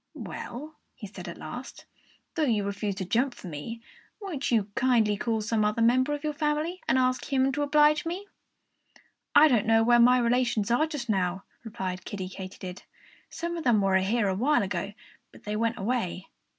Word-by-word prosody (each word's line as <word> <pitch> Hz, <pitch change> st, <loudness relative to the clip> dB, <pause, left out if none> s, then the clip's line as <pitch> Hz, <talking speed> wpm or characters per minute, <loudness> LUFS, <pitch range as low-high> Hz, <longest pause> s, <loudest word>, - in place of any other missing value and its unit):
"Well," 300 Hz, +6 st, -7 dB, 0.2 s
he 225 Hz, -, -9 dB
said 190 Hz, -3 st, -9 dB
at 170 Hz, -, -7 dB
last, 250 Hz, +2 st, -8 dB, 0.5 s
"though 325 Hz, -, -2 dB
you 220 Hz, -6 st, +1 dB
refuse 200 Hz, 0 st, -3 dB
to 190 Hz, -, -4 dB
jump 240 Hz, +7 st, +1 dB
for -, -, -12 dB
me, 175 Hz, +8 st, -6 dB, 0.4 s
won't 360 Hz, -10 st, -4 dB
you 215 Hz, -4 st, +1 dB
kindly 230 Hz, -4 st, +2 dB
call 220 Hz, +1 st, -1 dB
some 215 Hz, 0 st, 0 dB
other 210 Hz, +2 st, +1 dB
member 255 Hz, +5 st, +3 dB
of 290 Hz, -, -9 dB
your 305 Hz, -1 st, -1 dB
family 305 Hz, +4 st, -1 dB
and -, -, +3 dB
ask 255 Hz, -1 st, +1 dB
him 265 Hz, 0 st, +3 dB
to 290 Hz, -, -2 dB
oblige 300 Hz, +1 st, +4 dB
me?" 355 Hz, +4 st, -4 dB, 1.1 s
"I 300 Hz, +2 st, +9 dB
don't 235 Hz, -7 st, +2 dB
know 225 Hz, 0 st, +5 dB
where 240 Hz, +1 st, +5 dB
my 250 Hz, +2 st, +6 dB
relations 235 Hz, -3 st, +1 dB
are 305 Hz, +7 st, +3 dB
just 295 Hz, -7 st, -5 dB
now," 190 Hz, -3 st, 0 dB, 0.2 s
replied 190 Hz, -5 st, -5 dB
Kiddie 190 Hz, -2 st, -5 dB
Katydid. 185 Hz, 0 st, -8 dB, 0.5 s
"Some 340 Hz, 0 st, -4 dB
of 330 Hz, -, -4 dB
them 240 Hz, -4 st, +4 dB
were 195 Hz, -1 st, +3 dB
here 205 Hz, +3 st, +1 dB
a 190 Hz, -, +1 dB
while 255 Hz, +6 st, +2 dB
ago; 190 Hz, +1 st, -3 dB, 0.4 s
but -, -, -17 dB
they 210 Hz, 0 st, -3 dB
went 230 Hz, +2 st, 0 dB
away." 195 Hz, -4 st, -2 dB
235 Hz, 190 wpm, -27 LUFS, 200-270 Hz, 1.1 s, I